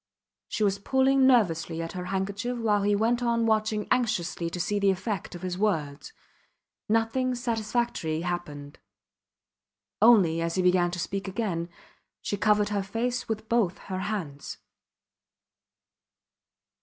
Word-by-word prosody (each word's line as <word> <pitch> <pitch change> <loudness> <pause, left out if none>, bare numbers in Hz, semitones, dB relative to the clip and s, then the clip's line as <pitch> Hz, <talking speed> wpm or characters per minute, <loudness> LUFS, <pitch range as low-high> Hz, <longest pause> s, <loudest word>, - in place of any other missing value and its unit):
She 215 - -2
was 200 -1 +1
pulling 265 +4 +3
nervously 170 -10 +2
at 165 0 -4
her 180 -1 -5
handkerchief 200 +6 -2
while 215 -3 +1
he 205 +1 +2
went 230 +4 +1
on 235 -1 +1
watching 215 -1 +1
anxiously 180 -9 0
to 180 - -6
see 205 +4 0
the 200 -1 +3
effect 190 -1 -2
of 175 - -9
his 180 0 -3
words. 155 - -1 0.8
Nothing 225 +3 +1
satisfactory 230 - -1
happened. 155 -5 -5 1.2
Only, 190 -8 +5
as 165 0 -2
he 185 - +1
began 180 -1 +3
to 175 - -5
speak 195 +3 -3
again, 185 -4 -2 0.5
she - - -3
covered 210 0 +2
her 205 -1 0
face 230 +6 -3
with 220 0 -3
both 220 -6 +1 0.2
her 185 - -2
hands. 190 -9 -4
205 Hz, 135 wpm, -27 LUFS, 175-225 Hz, 1.2 s, Only